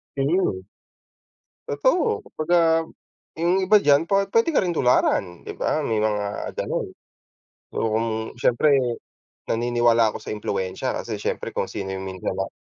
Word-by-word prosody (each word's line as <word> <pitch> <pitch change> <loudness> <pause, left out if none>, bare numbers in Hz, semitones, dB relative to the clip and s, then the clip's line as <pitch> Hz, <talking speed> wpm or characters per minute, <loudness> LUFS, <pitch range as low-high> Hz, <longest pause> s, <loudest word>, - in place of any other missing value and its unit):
Mhm. 140 - 0 1.1
Totoo. 365 - +1
Kumbaga, 165 0 +2 0.6
yung 175 +3 +2
iba 210 +3 +5
diyan 145 -3 +4
pa 195 0 +3
pwede 230 +8 +2
ka 310 - +2
rin 175 - -1
tularan, 100 - +1
'di - - -4
ba? - - -1
May 110 -2 0
mga 105 -1 -2
gano'n. - - -2 0.9
Oo, 115 - 0
kung 115 +1 +1 0.3
siyempre, 140 +4 +3 0.7
naniniwala 120 -1 +2
ako - - -6
sa - - -7
impluwensya, 100 +4 -3
kasi 110 -3 -4
siyempre - - -3
kung - - -2
sino 95 -1 -5
yung 95 0 -6
minsan 95 -1 -4
na 95 - -1
125 Hz, 145 wpm, -23 LUFS, 105-170 Hz, 1.1 s, iba